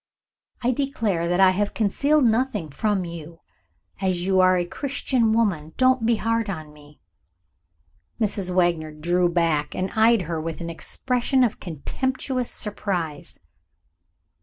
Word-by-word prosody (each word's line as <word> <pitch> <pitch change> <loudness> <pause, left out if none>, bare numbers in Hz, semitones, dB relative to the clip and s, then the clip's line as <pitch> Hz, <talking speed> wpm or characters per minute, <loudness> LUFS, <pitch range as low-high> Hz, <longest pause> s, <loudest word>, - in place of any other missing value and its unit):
I 245 - +3
declare 230 -10 -1
that 175 +1 +1
I 190 -1 +7
have 205 +2 -1
concealed 280 +8 +2
nothing 225 - 0
from 200 +4 0
you. 165 -1 -9 0.6
As 185 -2 0
you 190 0 +2
are 185 0 +5
a 175 - 0
Christian 260 0 -1
woman, 190 -9 0
don't 255 -3 +3
be 235 - +4
hard 230 0 -1
on 155 -5 -6
me!" 150 0 -18 1.2
Mrs. 200 -4 0
Wagner 175 -3 +1
drew 175 +4 +1
back, 165 -4 0
and 185 +1 -2
eyed 220 -2 +4
her 165 -1 -3
with 165 -1 -5
an 170 -1 -4
expression 250 - 0
of 235 - 0
contemptuous 255 - -3
surprise. 180 -8 -3
190 Hz, 135 wpm, -24 LUFS, 170-230 Hz, 1.2 s, I